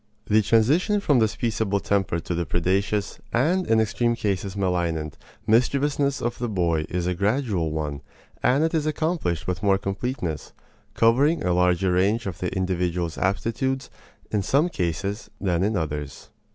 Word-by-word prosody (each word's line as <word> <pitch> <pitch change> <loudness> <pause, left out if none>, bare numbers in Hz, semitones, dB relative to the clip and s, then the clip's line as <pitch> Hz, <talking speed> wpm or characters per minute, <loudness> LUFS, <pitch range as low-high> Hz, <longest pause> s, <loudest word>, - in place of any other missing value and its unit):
The 110 +1 +4
transition 130 - +3
from 145 -10 +3
this 110 -2 +1
peaceable 110 -4 0
temper 95 -4 0
to 85 - -4
the 85 0 -1
predaceous, 100 +3 0
and 170 +10 +1
in 110 0 +4
extreme 120 +2 +1
cases 100 -3 -2
malignant, 85 -5 -1 0.3
mischievousness 140 +5 +2
of 120 0 -2
the 120 -1 -2
boy 85 -6 0
is 90 -1 -2
a 90 - 0
gradual 100 - 0
one, 75 -2 -3 0.4
and 135 +5 +3
it 165 - 0
is 155 -2 0
accomplished 155 - -1
with 90 0 -2
more 100 -2 +3
completeness, 95 - -4 0.4
covering 135 +8 +3
a 90 - +1
larger 90 +1 +2
range 100 +6 +2
of 95 -4 -5
the 90 - -2
individual's 90 -3 -1
aptitudes, 120 +7 -1 0.4
in 105 - +1
some 145 - +2
cases 100 - -3
than 90 -3 0
in 105 +2 +1
others. 75 -4 -5
100 Hz, 155 wpm, -24 LUFS, 90-120 Hz, 0.4 s, The